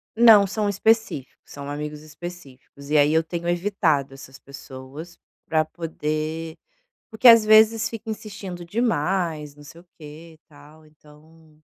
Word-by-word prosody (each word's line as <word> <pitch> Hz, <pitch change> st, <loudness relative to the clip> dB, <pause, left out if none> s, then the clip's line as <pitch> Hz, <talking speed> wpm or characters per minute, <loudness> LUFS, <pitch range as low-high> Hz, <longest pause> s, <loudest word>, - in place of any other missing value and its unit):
Não, 225 Hz, -3 st, +7 dB
são 210 Hz, +1 st, -2 dB
específicos, 220 Hz, -, 0 dB
são 140 Hz, 0 st, -8 dB
amigos 150 Hz, +1 st, -6 dB
específicos, 150 Hz, -3 st, -12 dB
e 155 Hz, -, +4 dB
aí 145 Hz, 0 st, +4 dB
eu 160 Hz, -, +3 dB
tenho 170 Hz, +1 st, -6 dB
evitado 170 Hz, -7 st, 0 dB
essas 135 Hz, 0 st, -13 dB
pessoas 140 Hz, +4 st, -11 dB, 0.3 s
para 155 Hz, -1 st, +1 dB
poder 160 Hz, 0 st, -5 dB, 0.6 s
porque 220 Hz, +3 st, +3 dB
às 230 Hz, -2 st, +8 dB
vezes 220 Hz, +1 st, +5 dB
fica 225 Hz, 0 st, -9 dB
insistindo 195 Hz, -5 st, -7 dB
demais, 170 Hz, -7 st, -2 dB
não 145 Hz, -, -16 dB
sei 165 Hz, +3 st, -14 dB
o -, -, -26 dB
que 160 Hz, +2 st, -12 dB
e -, -, -21 dB
tal, 150 Hz, +1 st, -18 dB
então 155 Hz, +1 st, -21 dB
160 Hz, 145 wpm, -23 LUFS, 150-195 Hz, 0.6 s, às